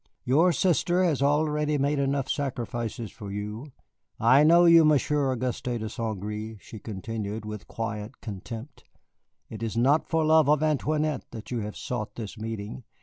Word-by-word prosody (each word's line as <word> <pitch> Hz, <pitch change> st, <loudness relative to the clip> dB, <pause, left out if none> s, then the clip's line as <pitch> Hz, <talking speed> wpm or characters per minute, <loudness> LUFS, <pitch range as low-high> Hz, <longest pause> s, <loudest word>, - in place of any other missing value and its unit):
Your 160 Hz, +8 st, +4 dB
sister 180 Hz, 0 st, +2 dB
has 155 Hz, -7 st, +1 dB
already 150 Hz, +1 st, +2 dB
made 140 Hz, +1 st, +1 dB
enough 140 Hz, -1 st, 0 dB
sacrifices 120 Hz, -5 st, -3 dB
for 105 Hz, -4 st, -8 dB
you. 105 Hz, +7 st, -5 dB, 0.5 s
I 130 Hz, +6 st, +6 dB
know 170 Hz, +3 st, +6 dB
you, 170 Hz, -1 st, +8 dB
Monsieur 150 Hz, -2 st, +2 dB
Auguste 125 Hz, 0 st, -3 dB
de 110 Hz, -1 st, -4 dB
St. 110 Hz, -2 st, -4 dB
Gré," 105 Hz, +2 st, -5 dB
she 110 Hz, -, -11 dB
continued 105 Hz, +1 st, -5 dB
with 105 Hz, -1 st, -7 dB
quiet 110 Hz, -1 st, -5 dB
contempt. 115 Hz, +5 st, -8 dB, 0.6 s
"It 110 Hz, -1 st, -9 dB
is 115 Hz, 0 st, -3 dB
not 140 Hz, +6 st, +3 dB
for 160 Hz, -1 st, +2 dB
love 155 Hz, -2 st, +5 dB
of 150 Hz, 0 st, +3 dB
Antoinette 155 Hz, -3 st, 0 dB
that 115 Hz, 0 st, -9 dB
you 120 Hz, -, -1 dB
have 105 Hz, -1 st, -5 dB
sought 105 Hz, -4 st, -4 dB
this 110 Hz, -3 st, -6 dB
meeting. 110 Hz, +2 st, -6 dB
120 Hz, 160 wpm, -27 LUFS, 110-150 Hz, 0.6 s, you